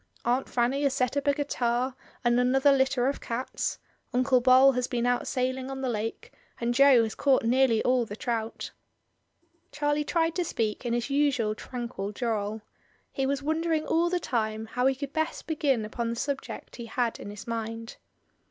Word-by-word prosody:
Aunt 250 +2 +1
Fanny 250 +3 +1
has 280 -2 +1
set 255 0 0
up 285 0 -1
a 285 - +5
guitar 255 -3 -1 0.3
and 240 0 +3
another 265 +3 +4
litter 265 -2 +2
of 280 - -2
cats; 235 +3 -3 0.3
Uncle 255 0 +3
Bol 260 +2 +7
has 250 -1 -1
been 240 -1 -1
out 245 0 +1
sailing 260 0 -1
on 270 0 -5
the 260 - -1
lake, 225 - -4 0.3
and 235 0 0
Jo 270 -2 +6
has 220 - -3
caught 275 -3 +2
nearly 235 -1 +3
all 250 -1 +2
the 205 - -7
trout." 225 -1 -3 1.0
Charlie 290 +1 0
tried 330 +1 +1
to 355 - +1
speak 225 -5 -2
in 235 - 0
his 240 +3 -1
usual 275 -7 +2
tranquil 235 -4 -5
drawl. 215 -1 -2 0.5
He 270 -1 -1
was 280 0 -1
wondering 315 +1 0
all 340 +1 +2
the 360 0 0
time 220 -6 -2
how 250 +3 0
he 270 - +2
could 280 +1 -6
best 315 +1 -2
begin 280 -8 0
upon 230 +2 -3
the 235 - -2
subject 275 +3 -5
he 235 -1 -7
had 235 0 -1
in - - -7
his 205 0 -9
mind. 225 0 -5
255 Hz, 185 wpm, -28 LUFS, 235-275 Hz, 1.0 s, Bol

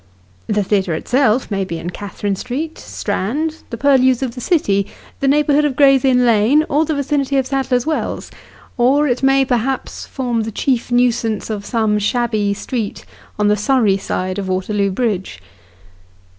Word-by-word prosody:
The 210 -1 +1
theatre 190 -4 0
itself 250 - +1
may 195 -1 0
bo 185 -3 -5
in 165 +2 -5
Catherine 205 +1 -4
Street, 280 - -5
Strand, 305 +11 -3
the 230 - -5
purlieus 260 -1 +3
of 250 -3 -3
the 250 - -8
city, 200 - +1 0.3
the 275 - 0
neighbour 295 +1 +3
hood 295 +1 +4
of 290 -3 0
Gray's 275 -1 +5
Inn 250 -2 +3
Lane, 235 +7 +4
or 300 +3 +2
the 315 - -1
vicinity 280 -1 0
of 265 - +1
Sadler's 260 -2 0
Wells; 315 -1 -3 0.5
or 275 +5 +3
it 245 -2 0
may, 270 0 +4
perhaps, 255 +1 -2
form 245 -4 -2
the 220 +1 -4
chief 245 +2 -1
nuisance 235 -3 +1
of 205 -1 -5
some 220 -3 +1
shabby 215 -1 0
street, 225 -1 -4 0.3
on 210 0 +2
the 210 - +4
Surrey 210 -2 +2
side 185 0 -3
of 195 - -4
Waterloo 195 +2 0
Bridge. 195 - -2
240 Hz, 170 wpm, -18 LUFS, 205-270 Hz, 0.5 s, Gray's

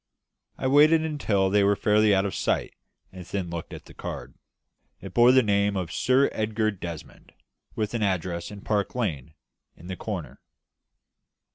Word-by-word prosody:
I - - -5
waited 155 +2 +4
till 95 -6 +1
they 105 0 +4
were 100 +1 +3
fairly 105 0 +3
out 95 +1 +1
of 100 - -3
sight, - - -1 0.4
and 95 -1 -9
then 90 -1 -4
looked 85 -1 -6
at - - -9
the - - -14
card. - - -7 0.7
It - - -10
bore 120 +1 +6
the 130 0 +5
name 100 -1 +1
of 90 -3 -3
"Sir 130 +6 +3
Edgar 110 0 0
Desmond," 85 -5 -9 0.4
with 110 0 -2
an 115 - -2
address 90 -3 -1
in 105 -1 -10
Park 105 +1 -1
Lane, 80 - -3 0.4
in 85 - -14
the 95 +1 -5
corner. - - -6
100 Hz, 165 wpm, -26 LUFS, 95-115 Hz, 0.7 s, bore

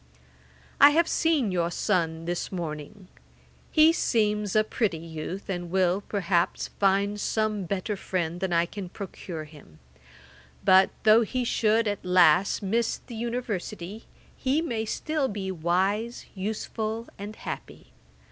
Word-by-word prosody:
'I 285 - +10
have 325 +3 +3
seen 305 - +1
your 170 -2 0
son 165 -2 -1
this 175 0 -3
morning; 175 +2 -6 0.6
he 315 +1 +6
seems 210 - +1
a 215 - +5
pretty 215 -5 -1
youth, 165 +4 -6
and 175 -2 -4
will, 185 +1 +2
perhaps, 190 -4 0
find 200 +1 +1
some 215 -2 -1
better 200 +3 -2
friend 175 -3 -3
than 190 -1 -2
I 170 0 +3
can 185 +1 -7
procure 180 -4 -7
him; 150 - -15 0.9
but, 190 +1 +6
though 220 +1 +7
he 250 +3 -1
should 225 -1 +2
at 205 -1 -2
last 180 +1 +4
miss 225 +4 0
the 240 - -11
University, 220 -4 -4 0.3
he 270 +3 +1
may 235 -9 -2
still 305 +5 -1
be 195 -4 -4
wise, 190 +7 0
useful, 220 +3 -3
and 205 +2 -6
happy. - - -8
200 Hz, 135 wpm, -27 LUFS, 175-220 Hz, 0.9 s, I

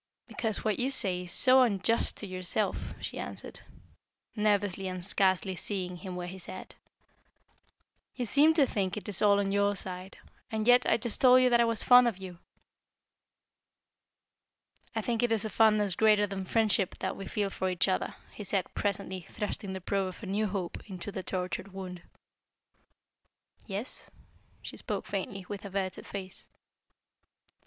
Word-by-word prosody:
"Because 220 -3 -2
what 215 -3 +1
you 255 +2 +1
say 185 -9 +2
is 175 - -8
so 260 0 +6
unjust 225 -1 +1
to - - -4
yourself," 185 +2 -1
she - - -5
answered, - - -6 0.8
nervously 205 -3 +1
and 185 -1 -5
scarcely 190 -1 +2
seeing 180 -1 -3
him 185 0 -7
where 180 0 -4
he 185 +2 -8
sat. 175 - -9 1.4
"You 250 - -2
seem 295 +7 +5
to 295 -4 +5
think 200 -5 -2
it 210 - -7
is 205 -3 +1
all 200 -1 +5
on 195 -1 0
your 200 0 +2
side. 185 0 -6 0.3
And 220 -1 -2
yet, 245 +1 +5
I - - +4
just 230 -1 0
told 255 0 +7
you 250 - +4
that 235 0 +5
I - - +4
was 230 -2 0
fond 250 0 +7
of 225 -6 -1
you." 185 -3 -9 2.6
"I 220 - 0
think 230 +1 -1
it 240 -1 +1
is 225 -1 0
a 215 - -4
fondness 210 -2 +3
greater 210 +1 +4
than 195 -1 -5
friendship 215 -3 +1
that - - -3
we 195 - -7
feel 205 -2 -1
for 190 - -2
each 180 +1 +1
other," 185 - -1 0.2
he 210 - -8
said, 195 -2 -2
presently, 190 -3 -3
thrusting 205 -2 -4
the 190 - -6
probe 195 +1 -1
of 185 +4 -9
a - - -4
new 205 +3 0
hope 185 -3 -4
into 190 +1 -6
the 190 - -4
tortured 185 +1 -4
wound. 185 -2 -7 1.7
"Yes?" 205 +5 -6 0.5
she - - -8
spoke - - -3
faintly, 195 -1 -4
with 205 -1 -6
averted 195 -2 -4
face. 190 -2 -8
200 Hz, 165 wpm, -30 LUFS, 185-220 Hz, 2.6 s, told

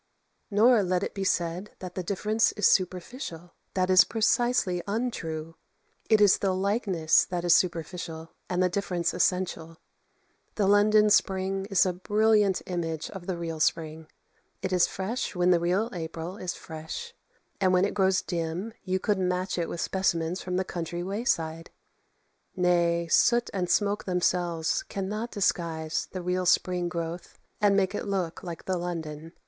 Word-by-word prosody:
Nor 220 +2 +5
let 185 -1 0
it - - -4
be 195 - -3
said 180 +1 -1
that 180 -1 -8
the 185 - -3
difference 210 +4 +1
is 210 - -1
superficial. 180 - -1 0.2
That 185 0 +1
is 185 - +8
precisely 225 -4 +1
untrue; 165 -8 -3 0.5
it 220 -2 +5
is 205 -2 +5
the 195 -2 +1
likeness 190 -5 +2
that 175 -1 -3
is 175 - +6
superficial, 165 -2 -1 0.2
and 180 0 +1
the - - +4
difference 180 -2 -1
essential. 170 -3 -1 0.8
The 205 - +1
London 210 +1 +5
spring 195 0 +1
is 195 -3 +3
a 185 - 0
brilliant 210 +1 +2
image 165 -3 -3
of 190 -3 -9
the 185 -2 -2
real 165 -2 -4
spring. 160 0 -1 0.6
It 190 -1 -1
is 180 -1 +4
fresh 205 +3 -3
when 180 0 +3
the 175 - +4
real 180 +6 +1
April 165 +1 -5
is 180 -3 -4
fresh; 160 - -7 0.5
and 190 -2 +3
when 185 +1 +4
it 205 - -2
grows 190 -2 +2
dim 175 +5 -3
you 185 -1 -1
could 205 0 0
match 180 0 -1
it 170 - -2
with 170 - -4
specimens 175 -2 0
from 180 0 -3
the 190 - 0
country 175 0 -4
wayside. 165 -5 -2 0.9
Nay, 170 -2 +2
soot 240 +8 +3
and 180 -3 -2
smoke 205 +3 +1
themselves 175 - 0
cannot 215 - -4
disguise 165 -6 -1
the 185 -1 -5
real 180 0 -1
spring 180 0 +2
growth 170 0 -5 0.2
and 200 -1 +4
make 195 0 +1
it 210 - -4
look 185 -4 -2
like 170 -3 -7
the 185 -2 -1
London. 165 -2 -5
180 Hz, 160 wpm, -27 LUFS, 170-200 Hz, 0.9 s, is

